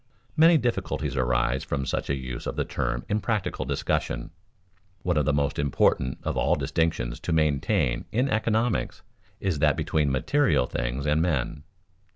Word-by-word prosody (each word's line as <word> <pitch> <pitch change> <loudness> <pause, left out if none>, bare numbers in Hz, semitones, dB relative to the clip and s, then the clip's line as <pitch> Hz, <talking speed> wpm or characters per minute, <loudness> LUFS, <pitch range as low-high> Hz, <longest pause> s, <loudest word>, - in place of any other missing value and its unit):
Many 165 +1 +6
difficulties 105 - -2
arise 65 0 +1
from 70 -2 -2
such - - -2
a 70 - +1
use 65 -2 -6
of - - -3
the - - -1
term - - -2
in 105 +1 0
practical 100 - -1
discussion. 65 0 -2 0.7
One 90 -1 +1
of 75 -2 +2
the 75 - +3
most 70 0 0
important 65 -2 +2
of - - -2
all - - +2
distinctions 60 -7 -1
to - - -4
maintain 70 -6 +1
in 125 +6 +1
economics 110 -1 0 0.4
is 95 -7 -1
that 75 -1 +3
between 75 -3 +1
material 130 - +2
things 65 +4 -3
and 75 +1 +2
men. 75 -3 -1
75 Hz, 160 wpm, -26 LUFS, 65-95 Hz, 0.7 s, Many